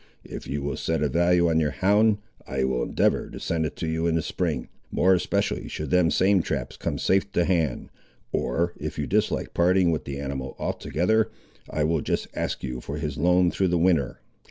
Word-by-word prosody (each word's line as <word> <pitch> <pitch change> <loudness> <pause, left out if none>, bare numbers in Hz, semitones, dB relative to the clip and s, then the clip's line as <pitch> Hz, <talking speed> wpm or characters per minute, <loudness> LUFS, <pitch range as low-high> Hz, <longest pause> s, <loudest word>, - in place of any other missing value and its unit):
If - - -8
you 70 0 -3
will 70 -1 -2
set 80 -1 -1
a 75 - +1
value 85 +3 +3
on 80 -1 +3
your 75 -2 +2
hound, 105 +7 +3 0.3
I 65 0 -1
will 65 -2 0
endeavour - - +1
to - - -8
send 80 -1 -1
it - - -9
to 80 - -4
you 80 +1 0
in 85 - +1
the 80 - 0
spring, 80 -7 -2 0.2
more 95 +1 +3
especially 90 - 0
should 75 - -5
them 90 -2 +4
same 95 +1 +3
traps - - -3
come - - -3
safe 95 +1 +1
to 85 - +2
hand; 80 -8 0 0.4
or, 85 +8 0
if - - -5
you 75 - -1
dislike 105 +5 0
parting 90 0 +3
with 80 - -2
the 70 0 -5
animal 65 -2 -4
altogether, 110 +7 0 0.4
I 75 - -1
will 80 0 +1
just - - -1
ask - - -3
you 60 -2 -4
for 70 +4 -5
his 75 -1 -4
loan 90 +2 +4
through 95 - +1
the 90 0 +1
winter. 85 -6 +1
85 Hz, 205 wpm, -25 LUFS, 75-90 Hz, 0.4 s, them